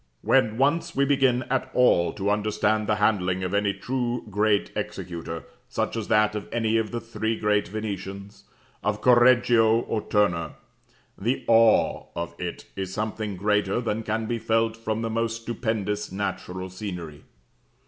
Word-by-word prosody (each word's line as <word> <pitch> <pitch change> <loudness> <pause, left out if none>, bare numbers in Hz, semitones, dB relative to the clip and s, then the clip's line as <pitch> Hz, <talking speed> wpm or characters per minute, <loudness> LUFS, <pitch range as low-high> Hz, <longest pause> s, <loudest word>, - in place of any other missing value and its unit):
When 115 -5 +3
once 165 +6 +1
we 140 - +3
begin 135 -3 +2
at 130 +1 -1
all 85 -9 +4
to 100 0 -1
understand 105 0 +1
the 105 - +2
handling 95 -3 +1
of 90 +1 -3
any 100 0 +2
truly 120 +2 -2
great 105 0 +1
executor, 85 -1 -5 0.3
such - - -2
as 110 -3 -3
that 105 0 +3
of 105 -1 -5
any 115 -1 +1
of 110 -1 0
the 120 - -3
three 110 -1 -3
great 105 -1 +1
Venetians, 100 -1 -6 0.4
of 105 0 0
Correggio, 120 -2 +5
or 110 -2 -2
Turner, 95 -7 +1 0.7
the 120 +6 -1
awe 115 -1 +4
of 85 0 -4
it 90 -1 -5
is 95 -1 -4
something 105 -1 -3
greater 105 +1 +1
than 115 -2 -2
can 110 0 -2
be 115 +1 -2
felt 115 0 +1
from 115 0 -3
the 115 - -1
most 115 0 -2
stupendous 110 -4 -2
natural 95 -1 -4
scenery. 90 -6 -7
110 Hz, 155 wpm, -25 LUFS, 100-115 Hz, 0.7 s, Correggio